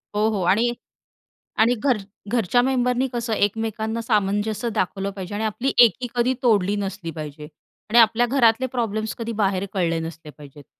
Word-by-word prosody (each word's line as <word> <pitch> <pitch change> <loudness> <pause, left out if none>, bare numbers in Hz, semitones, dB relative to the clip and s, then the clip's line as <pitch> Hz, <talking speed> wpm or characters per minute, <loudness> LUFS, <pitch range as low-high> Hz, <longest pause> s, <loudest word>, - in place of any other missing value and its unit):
हो, 210 +1 +2
हो, 210 -3 -2
आणि 215 +7 +3 0.9
आणि 240 +2 +4
घर 250 +1 +1 0.4
घरच्या 245 +1 +2
मेंबरनी 250 0 +1
कसं 235 -1 -3
एकमेकांना 220 +2 -1
सामंजस्य 210 +1 0
दाखवलं 195 +1 -1
पाहिजे 195 0 -7
आणि 215 - -2
आपली 220 +5 -1
एकी 235 +3 0
कधी 245 +2 +1
तोडली 205 -4 +2
नसली 195 -3 -4
पाहिजे 150 -1 -7 0.5
आणि 235 - +5
आपल्या 230 +1 +5
घरातले 245 -1 +3
प्रॉब्लेम्स 220 -2 -2
कधी 230 0 -4
बाहेर 195 0 0
कळले 170 -4 0
नसले 160 -1 -8
पाहिजेत. 145 -1 -14
215 Hz, 155 wpm, -23 LUFS, 195-235 Hz, 0.9 s, आणि